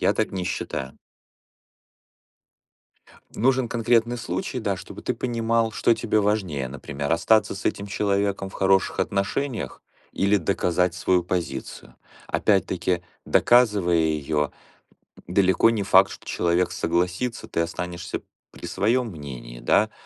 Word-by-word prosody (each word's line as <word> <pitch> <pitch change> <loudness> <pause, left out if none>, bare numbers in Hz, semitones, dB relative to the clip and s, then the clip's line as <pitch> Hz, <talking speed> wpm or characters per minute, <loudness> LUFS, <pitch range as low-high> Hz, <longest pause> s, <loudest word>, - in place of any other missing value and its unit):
я - - +3
так - - -1
не 95 -2 -3
считаю. 65 -6 -4 2.4
Нужен 130 +1 +2
конкретный 120 +1 +2
случай, 95 +2 -3
да, 100 -4 -1
чтобы - - -10
ты - - -1
понимал, 115 -2 0
что 115 - +3
тебе 110 -2 0
важнее. 95 -10 0
Например, 70 +2 -4
остаться 110 +6 +3
с 100 - -8
этим 100 - -1
человеком 100 -1 0
в - - -15
хороших 95 -1 +2
отношениях 110 +5 -2 0.3
или 100 +1 +2
доказать 90 -1 +1
свою 90 0 +2
позицию. 85 -7 -4 0.3
Опять-таки, 90 -3 +1 0.2
доказывая 105 -8 +4
её, 75 -2 0 0.8
далеко 95 +3 +4
не 110 -3 0
факт, 95 0 +5
что - - -11
человек 85 +1 +1
согласится, 90 +8 -1
ты - - -3
останешься 85 +1 -4 0.3
при - - -11
своём 120 +4 +1
мнении, 65 -6 -9
да, - - +2
95 Hz, 125 wpm, -24 LUFS, 85-110 Hz, 2.4 s, факт